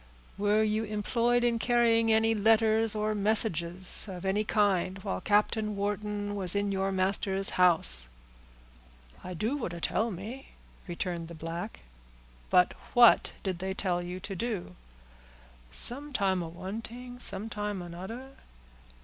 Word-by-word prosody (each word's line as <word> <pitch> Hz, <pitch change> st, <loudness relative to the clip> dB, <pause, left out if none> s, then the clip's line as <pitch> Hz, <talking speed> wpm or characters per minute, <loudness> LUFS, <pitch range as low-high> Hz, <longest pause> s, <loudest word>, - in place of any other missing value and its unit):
"Were 210 Hz, +2 st, +1 dB
you 215 Hz, +1 st, -1 dB
employed 230 Hz, +3 st, 0 dB
in 235 Hz, -1 st, +1 dB
carrying 230 Hz, -1 st, +2 dB
any 220 Hz, +1 st, +3 dB
letters 220 Hz, 0 st, +3 dB
or 215 Hz, 0 st, -1 dB
messages 190 Hz, -4 st, +4 dB
of 185 Hz, 0 st, -8 dB
any 200 Hz, +2 st, 0 dB
kind 200 Hz, -3 st, 0 dB
while 90 Hz, -, -4 dB
Captain 210 Hz, 0 st, 0 dB
Wharton 205 Hz, 0 st, -3 dB
was 190 Hz, -2 st, 0 dB
in 200 Hz, 0 st, -1 dB
your 195 Hz, 0 st, -1 dB
master's 195 Hz, +1 st, 0 dB
house?" 160 Hz, -, +4 dB, 1.2 s
"I 180 Hz, 0 st, -7 dB
do 220 Hz, -, -2 dB
what 230 Hz, -11 st, -5 dB
a 170 Hz, -, -7 dB
tell 220 Hz, +7 st, 0 dB
me," 220 Hz, +8 st, -9 dB, 0.3 s
returned 175 Hz, -1 st, -4 dB
the 170 Hz, -, -10 dB
black. 165 Hz, +6 st, -7 dB, 0.7 s
"But 180 Hz, 0 st, +4 dB, 0.2 s
what 240 Hz, -1 st, +5 dB
did 185 Hz, -3 st, -3 dB
they 190 Hz, +1 st, -4 dB
tell 180 Hz, -3 st, -1 dB
you 180 Hz, +1 st, -7 dB
to 195 Hz, 0 st, -7 dB
do?" 195 Hz, -, -5 dB, 0.9 s
"Sometime 220 Hz, -, +1 dB
a 170 Hz, -, -5 dB
one 190 Hz, +6 st, -7 dB
ting—sometime 220 Hz, -5 st, -4 dB
anoder." 190 Hz, +10 st, -9 dB
205 Hz, 130 wpm, -28 LUFS, 185-225 Hz, 1.2 s, what